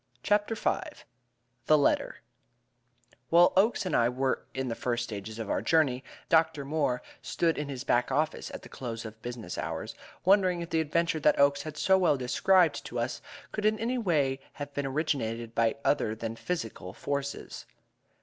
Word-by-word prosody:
CHAPTER 210 +2 +2
V - - 0 0.9
The 155 - +6
Letter 145 - +1 1.1
While 175 +1 +6
Oakes 200 +2 +3
and 185 - 0
I 120 0 +4
were 130 +1 -1
in 130 0 -3
the 115 - -1
first 120 0 -1
stages 110 -1 -6
of 115 -2 -4
our - - 0
journey, 140 -6 +2 0.2
Dr. 160 -4 +3
Moore 140 -4 0 0.2
stood 165 -1 0
in 150 -1 -4
his 130 -2 -5
back 125 -1 +1
office 155 +4 0
at - - -8
the - - -10
close 115 -3 -6
of 110 0 -9
business 120 -2 -6
hours, - - -4 0.3
wondering 185 -2 +4
if 170 - -7
the 160 - +2
adventure 160 +1 0
that 150 - +3
Oakes 140 0 +4
had 155 0 -7
so 190 +4 +4
well 170 -6 +3
described 155 +5 +3
to 120 - -6
us 120 +2 -2 0.3
could 210 - -4
in 215 0 +3
any 245 +3 -1
way 145 - +1
have 145 -1 -7
been 145 -1 -2
originated 120 -6 -2
by 115 -1 +2
other 110 -6 +2
than 115 0 -5
physical 115 - -4
forces. 140 +4 -4
140 Hz, 175 wpm, -29 LUFS, 120-165 Hz, 1.1 s, The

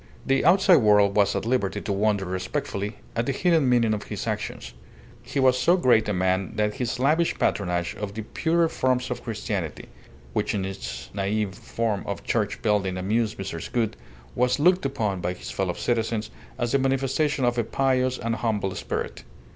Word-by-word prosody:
The 135 0 +2
outside 180 +1 +6
world 105 -4 +4
was 100 -1 +3
at - - -2
liberty 115 -5 0
to 100 - -2
wonder 100 -1 +1
respectfully 95 +3 -3 0.2
at 115 +1 0
the - - +2
hidden 160 -1 +2
meaning 115 -3 +3
of 105 - -4
his - - -5
actions. 60 -1 -4 0.5
He - - -4
was 130 -1 +4
so 175 +6 +4
great 120 -10 +3
a - - +2
man 95 0 0
that 105 0 +1
his 125 -3 -2
lavish 155 +6 +2
patronage 90 -3 0
of 105 -1 -5
the 110 - -4
"purer 165 +8 +1
forms 130 -4 0
of 125 - -4
Christianity" 100 -7 -4 0.4
(which - - 0
in 95 -2 -1
its 95 -10 -6
naive 100 0 -1
form 110 0 -2
of 100 -3 -4
church 105 -3 -1
building 100 -4 +1
amused 105 +4 0
Mrs. 90 -4 -5
Gould) 115 -3 0 0.4
was 125 +1 +2
looked 180 0 +3
upon 105 -9 -2
by 90 - -1
his - - -8
fellow 95 -2 -1
citizens 115 -2 -1 0.3
as 120 -1 -1
the 140 - +3
manifestation 135 +1 +1
of 120 0 +1
a - - +2
pious 130 +1 +1
and 115 0 -2
humble 105 -5 -1
spirit. - - -4
110 Hz, 180 wpm, -25 LUFS, 100-130 Hz, 0.5 s, outside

